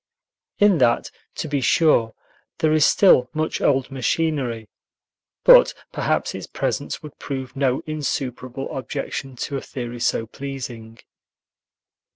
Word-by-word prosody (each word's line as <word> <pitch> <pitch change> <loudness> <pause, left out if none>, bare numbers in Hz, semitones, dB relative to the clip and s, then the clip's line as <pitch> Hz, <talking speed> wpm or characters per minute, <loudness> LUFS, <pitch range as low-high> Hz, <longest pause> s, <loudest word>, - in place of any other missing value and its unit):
In 205 -5 +4
that, 120 -2 +2 0.2
to - - -4
be 145 -2 -1
sure, 120 -5 +3 0.4
there 155 -2 +2
is 155 -2 +5
still 130 -11 +5
much 155 0 -1
old 135 -1 +1
machinery, 130 -4 -1 0.8
but - - +7 0.2
perhaps - - -1
its - - -7
presence - - -3
would 150 -2 -11
prove 130 -2 -5
no 135 -2 0
insuperable 135 -4 -4
objection 135 0 -5
to 140 +3 -4
a - - -5
theory 120 -2 -6
so 115 -1 0
pleasing. 120 -3 -7
135 Hz, 125 wpm, -22 LUFS, 125-155 Hz, 0.8 s, but